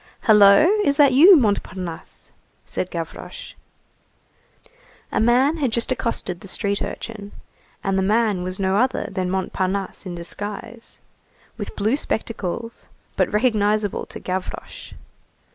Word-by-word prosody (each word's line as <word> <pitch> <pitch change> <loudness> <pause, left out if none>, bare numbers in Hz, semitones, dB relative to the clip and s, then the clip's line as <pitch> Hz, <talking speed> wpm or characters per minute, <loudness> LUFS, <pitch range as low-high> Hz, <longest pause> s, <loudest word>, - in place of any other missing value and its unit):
"Hullo, 210 +5 +6 0.2
is 280 -5 +1
that 280 -3 +5
you, 345 +9 +9
Montparnasse?" 190 - -3 0.3
said 185 - -3
Gavroche. 165 -2 -7 1.6
A - - 0
man 255 +7 +3
had 270 -6 0
just 235 +3 -1
accosted 230 -8 -2
the 195 - -11
street 200 +1 -1
urchin, 210 -3 -6 0.5
and 195 -1 0
the - - +1
man 210 -1 +1
was 185 +1 -3
no 190 0 +1
other 255 +4 +1
than 185 -2 -2
Montparnasse 190 +1 -2
in 175 - -5
disguise, 205 +6 -7 0.6
with 205 - -7
blue 215 +5 +1
spectacles, 230 -4 -4 0.3
but - - +1
recognizable 210 -2 +1
to - - -9
Gavroche. 185 0 -6
205 Hz, 125 wpm, -22 LUFS, 190-235 Hz, 1.6 s, you